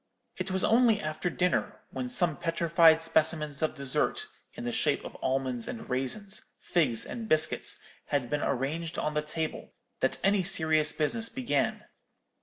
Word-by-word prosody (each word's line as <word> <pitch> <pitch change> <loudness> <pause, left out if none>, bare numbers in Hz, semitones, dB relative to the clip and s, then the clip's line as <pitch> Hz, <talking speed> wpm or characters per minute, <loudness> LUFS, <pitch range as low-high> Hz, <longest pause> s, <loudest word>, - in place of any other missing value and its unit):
It 185 +1 -3
was 190 0 +1
only 230 -1 +4
after 155 +3 -2
dinner, 180 +1 0
when 130 -2 -4
some 175 +1 0
petrified 165 0 +4
specimens 160 -2 +1
of 155 0 0
dessert, 150 - 0 0.3
in - - -7
the 240 - -2
shape 155 -10 0
of - - -8
almonds 130 -2 -1
and 115 - -6
raisins, 190 +11 -3 0.2
figs 135 -10 0
and 225 -2 -6
biscuits, 155 0 +2 0.3
had 140 -4 -1
been 150 +3 -1
arranged 155 +6 -2
on 150 - -1
the 150 - +1
table, 155 +1 -4 0.3
that - - +1
any 200 +1 +3
serious 160 -4 +3
business 225 +9 -1
began. 260 -2 -1
160 Hz, 155 wpm, -29 LUFS, 145-185 Hz, 0.3 s, only